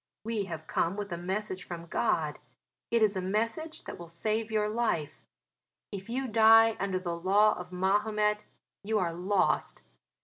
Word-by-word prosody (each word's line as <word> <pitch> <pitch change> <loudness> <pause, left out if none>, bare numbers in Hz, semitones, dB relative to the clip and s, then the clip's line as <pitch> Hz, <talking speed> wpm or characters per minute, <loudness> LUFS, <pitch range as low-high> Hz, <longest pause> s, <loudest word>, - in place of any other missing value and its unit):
We 220 -2 -2
have 165 -4 -7
come 170 +4 0
with 205 -2 -5
a - - -1
message 190 +1 -3
from 170 -2 -7
God; - - 0 0.5
it 230 -1 +3
is 210 -2 +3
a 185 - -1
message 225 - -2
that - - -8
will 170 - -8
save 215 +6 -2
your 215 -1 +1
life. 210 -9 -1 0.7
If 195 0 -7
you 260 +3 -2
die 225 0 +6
under 195 -1 -1
the 175 -2 -3
law 200 +5 +4
of 180 0 -8
Mahomet 210 +3 +1 0.4
you 215 +2 0
are 175 -4 0
lost. 185 +4 0
205 Hz, 165 wpm, -29 LUFS, 180-220 Hz, 0.7 s, die